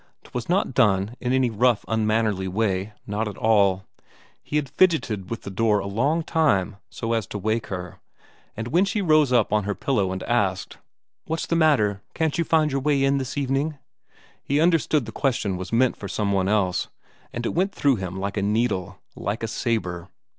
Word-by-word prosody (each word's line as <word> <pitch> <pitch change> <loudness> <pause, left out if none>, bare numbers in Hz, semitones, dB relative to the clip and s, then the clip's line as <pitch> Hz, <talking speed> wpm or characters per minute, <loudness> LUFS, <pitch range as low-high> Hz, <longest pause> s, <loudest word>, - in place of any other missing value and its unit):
'Twas 125 +3 -6
not 180 -6 +1
done 105 -3 +2
in 125 - -2
any 130 -2 +2
rough 120 +1 +2
unmannerly 110 -3 0
way, 95 0 -1
not 105 +2 -2
at 105 - -7
all; 100 -4 +3 0.6
he - - -6
had 150 -2 +1
fidgeted 130 - +1
with 115 - -5
the 100 - -6
door 105 +1 +2
a 100 - -3
long 135 +12 0
time 105 - +1
so 115 0 -3
as 115 -3 -1
to - - -5
wake 110 +3 -1
her, 90 -2 -6 0.6
and 115 +2 -4
when 175 +7 +3
she 200 +2 -1
rose 155 -7 +3
up 115 -4 +3
on 105 -2 +2
her 105 -1 -2
elbow 105 -9 +2
and 95 0 -4
asked, - - -1 0.5
"What's 160 +1 -2
the 170 - -1
matter; 125 -12 +3
can't 160 -2 0
you - - +3
find 155 -2 +2
your 135 0 -1
way 140 -1 +2
in 135 0 +2
this 130 +1 -5
evening?" 140 +2 -1 0.7
he 140 +1 0
understood 160 -4 +2
the 110 - -7
question 115 -7 -1
was 95 +1 -6
meant 125 +2 +3
for 100 - -7
some 100 0 -1
one 95 -1 +1
else, 95 -3 +1 0.4
and 120 0 -4
it - - -1
went 190 +3 +1
through 140 - +2
him 95 -1 -5
like 100 +2 -3
a - - +1
needle; 100 -3 0 0.2
like 105 +4 -3
a - - 0
sabre. 95 -8 -2
115 Hz, 195 wpm, -24 LUFS, 100-140 Hz, 0.7 s, all